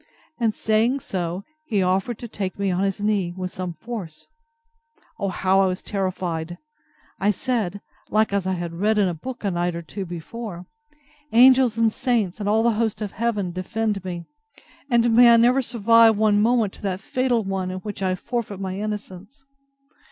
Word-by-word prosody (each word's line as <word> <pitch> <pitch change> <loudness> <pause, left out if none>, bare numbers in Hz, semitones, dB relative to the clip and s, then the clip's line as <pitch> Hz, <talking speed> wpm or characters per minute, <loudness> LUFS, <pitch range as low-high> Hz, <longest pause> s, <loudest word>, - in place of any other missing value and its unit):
And 225 -3 +1
saying 225 +5 +1
so, 180 -1 -3 0.2
he 210 -10 0
offered 190 +5 0
to 240 - -7
take 195 -4 -4
me 200 -1 0
on 180 +1 0
his 195 +1 -1
knee, 195 -5 0
with 185 -1 -4
some 180 -2 -5
force. 180 -4 -7 0.9
O 200 - -1
how 190 +1 +2
I 195 - +4
was 185 0 -3
terrified! 175 -4 -3 0.6
I 200 - +2
said, 205 -3 -1 0.3
like 215 0 +2
as 195 -2 0
I 190 - +1
had 170 -2 -4
read 210 +5 +1
in 205 -2 +3
a 175 - -1
book 245 +11 -8
a 200 - 0
night 175 0 -1
or 170 - -5
two 190 +4 -6
before, 175 +2 -7 0.7
Angels 250 -1 +6
and 225 -1 +3
saints, 235 -8 0
and 205 -1 -1
all 220 +2 +3
the 235 - +4
host 220 -2 -1
of 210 -3 -4
heaven, 210 -5 -1
defend 205 +2 -2
me! 175 -2 -5 0.6
And 235 -2 +3
may 240 0 +8
I 230 - +7
never 245 +3 +4
survive 230 -2 +4
one 210 -1 +3
moment 225 -3 +1
that 190 -2 -2
fatal 250 +1 0
one 190 -1 -2
in 185 - -4
which 205 -1 -6
I 185 -1 +1
shall - - -17
forfeit 230 -5 -3
my 190 0 -4
innocence! 210 +5 -6
205 Hz, 185 wpm, -23 LUFS, 185-230 Hz, 0.9 s, may